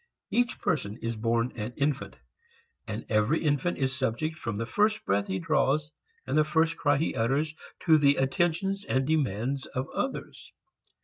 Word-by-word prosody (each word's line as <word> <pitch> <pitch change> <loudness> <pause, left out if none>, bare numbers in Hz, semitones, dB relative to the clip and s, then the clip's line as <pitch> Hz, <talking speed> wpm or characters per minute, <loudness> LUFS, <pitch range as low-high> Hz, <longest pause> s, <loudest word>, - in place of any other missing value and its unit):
Each 245 +1 +1
person 105 -8 -1
is 115 0 -1
born 115 +2 0
an 115 +1 -4
infant, 140 -1 -1 0.7
and 110 +1 -4
every 110 +10 +2
infant 150 +3 +1
is 130 -1 0
subject 130 +5 -1
from 115 -8 -4
the 115 - -2
first 210 - +1
breath 100 +1 +1
he 95 - -1
draws 145 - +1 0.3
and - - -2
the 155 - +5
first 160 +1 +2
cry 145 0 +2
he 160 - 0
utters 135 +7 0 0.3
to 160 -3 +6
the 140 -1 +5
attentions 175 +8 0
and 135 -8 0
demands 135 -3 0
of 130 0 -3
others. 265 - -4
140 Hz, 165 wpm, -28 LUFS, 115-160 Hz, 0.7 s, to